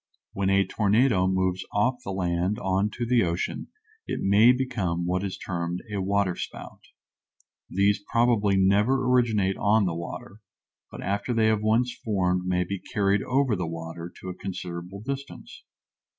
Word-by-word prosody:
When 95 0 0
a 95 0 +3
tornado 105 0 +2
moves 95 -1 0
off 125 +5 +1
the 95 - -4
land 90 +1 -1
on 95 +2 0
to 120 - -3
the 120 0 +3
ocean 85 0 -2 0.4
it - - -3
may 105 +5 +5
become 110 -10 -1
what 90 +2 0
is 95 -2 -4
termed 85 0 -4
a 100 - -1
waterspout. 100 -1 -2 0.9
These 100 +1 +2
probably 115 -4 +3
never 105 +8 +3
originate 110 -6 +2
on 105 0 +3
the 90 - -1
water, 100 +6 -7 0.5
but - - -9
after 100 +5 -1
they 110 -1 +3
have 110 -1 +1
once 115 +3 +2
formed 90 -4 0
may 90 0 +1
be 100 +2 -4
carried 100 +1 0
over 130 -3 +1
the 90 -3 -3
water 85 +1 -6
to 95 - -6
a - - -4
considerable 90 0 -6
distance. 135 +4 -7
100 Hz, 155 wpm, -26 LUFS, 90-110 Hz, 0.9 s, may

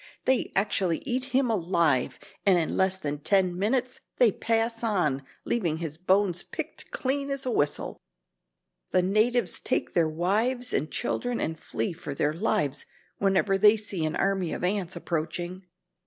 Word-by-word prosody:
They 260 -1 +2
actually 190 -4 +1
eat 255 -1 -1
him 265 -2 +1
alive, 170 - +1 0.3
and 190 -3 +5
in 165 - 0
less 190 0 +2
than 145 -5 -4
ten 185 +3 +2
minutes 250 +5 0 0.2
they 240 -4 +6
pass 225 +2 -1
on 175 -11 +1 0.2
leaving 170 -9 0
his 160 -2 -5
bones 185 -1 +2
picked - - -6
clean 275 +1 -1
as 275 -1 -2
a 255 - 0
whistle. 145 -9 -1 0.9
The 185 - +2
natives 215 +1 +2
take - - -1
their 165 -3 +3
wives 220 +10 0
and 150 - 0
children 245 -1 -1
and 160 - -2
flee 115 -4 -3
for 150 -4 -7
their 145 +2 +1
lives 150 -6 0 0.3
whenever 195 0 +2
they 210 +2 +7
see 200 -5 -3
an 155 - -1
army 195 -3 0
of - - -5
ants 190 -1 -1
approaching." 175 +3 -4
190 Hz, 155 wpm, -27 LUFS, 165-225 Hz, 0.9 s, they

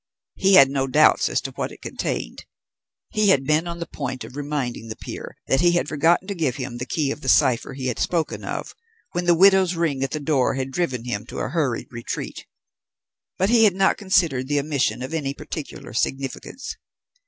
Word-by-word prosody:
He 195 0 +4
had 135 -3 +8
no 135 -1 0
doubts 130 - +4
as - - 0
to - - -6
what - - -4
it - - -14
contained; - - -4 0.7
he 215 -1 +2
had 140 -8 +4
been 155 +3 +2
on 170 0 -4
the 170 - -4
point 130 -5 -5
of 130 - -11
reminding 140 -6 -3
the 110 - -6
peer - - -8
that 135 - +2
he 175 0 +4
had 175 - +1
forgotten 165 +5 +2
to 200 - -2
give 155 -9 -1
him 125 -3 -5
the 125 - -4
key 145 -2 0
of 150 - -6
the 130 - -2
cipher 130 +2 +3
he 130 -1 -5
had 125 -3 -2
spoken 170 -3 -1
of - - -5 0.4
when 175 0 -2
the 175 -1 +5
widow's 190 0 +5
ring 155 -5 0
at 135 - -1
the 155 - -3
door 140 -3 +1
had 135 0 -3
driven 130 -7 -2
him 110 -2 -4
to - - -8
a - - -2
hurried 145 -5 -1
retreat, 120 -1 -6 0.9
but 190 +4 +1
he 230 -2 +6
had 200 -4 +3
not 190 0 +3
considered 170 -10 +1
the 145 0 +1
omission 140 -3 0
of 130 +5 -6
any 140 -4 -2
particular 145 -6 -7
significance. 135 - -3
145 Hz, 210 wpm, -23 LUFS, 130-175 Hz, 0.9 s, had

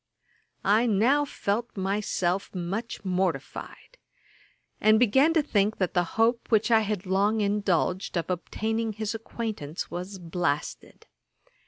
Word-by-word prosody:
I 215 +5 +4
now 240 +8 +3
felt 230 -3 -3
myself 195 -1 -1
much 195 +5 -4
mortified, 185 - -3 0.8
and 215 0 +5
began 265 +7 +4
to 320 - +4
think 210 -6 +1
that 185 -2 -1
the 175 - +3
hope 230 +1 +2
which 220 +1 +3
I 225 - +7
had 210 -3 -2
long 200 +4 +2
indulged 200 -3 0
of 170 +2 -2
obtaining 220 +5 -2
his 215 +1 -3
acquaintance 220 -8 -5
was 185 +3 -5
blasted. 165 -4 -3
205 Hz, 125 wpm, -27 LUFS, 185-225 Hz, 0.8 s, I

